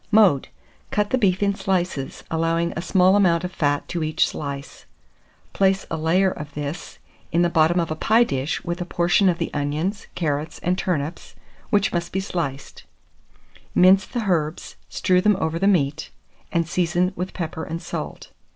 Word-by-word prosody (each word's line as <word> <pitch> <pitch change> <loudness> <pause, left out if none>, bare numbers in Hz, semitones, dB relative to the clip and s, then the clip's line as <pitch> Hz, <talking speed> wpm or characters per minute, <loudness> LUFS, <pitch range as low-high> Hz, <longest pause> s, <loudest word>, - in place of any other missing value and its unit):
Mode. 205 -10 +4 0.4
Cut 210 0 0
the 260 - +3
beef 190 -3 +2
in 200 0 +2
slices, 180 -8 -2
allowing 165 +1 0
a - - -2
small 185 +1 +4
amount 180 -4 +3
of 180 - -3
fat 145 -4 0
to 175 - -2
each 155 0 +2
slice; 140 -1 -7 0.7
place 195 -1 +2
a - - 0
layer 180 +4 +2
of 150 -3 -8
this 145 +3 -5 0.3
in 170 +1 +3
the 175 - +1
bottom 165 +2 +3
of 165 -2 -1
a - - -1
pie 220 +8 +4
dish, 140 - -2
with 175 0 -3
a - - -2
portion 175 +2 +3
of 175 - 0
the 165 - -3
onions, 155 +9 -2
carrots, 150 -2 -2
and 180 +1 +1
turnips, 170 -4 -3 0.3
which 205 -1 +2
must 170 -1 -2
be 190 - -1
sliced; 165 -8 -4 0.9
mince 190 +2 +6
the 240 -3 -3
herbs, 160 -4 -1
strew 180 0 +2
them 210 0 +3
over 160 +1 -1
the 195 - +2
meat, 160 -5 +1 0.4
and 170 -2 0
season 180 +1 +1
with 185 +1 -5
pepper 160 -2 -4
and 165 +1 -4
salt. - - -6
175 Hz, 175 wpm, -23 LUFS, 155-190 Hz, 0.9 s, mince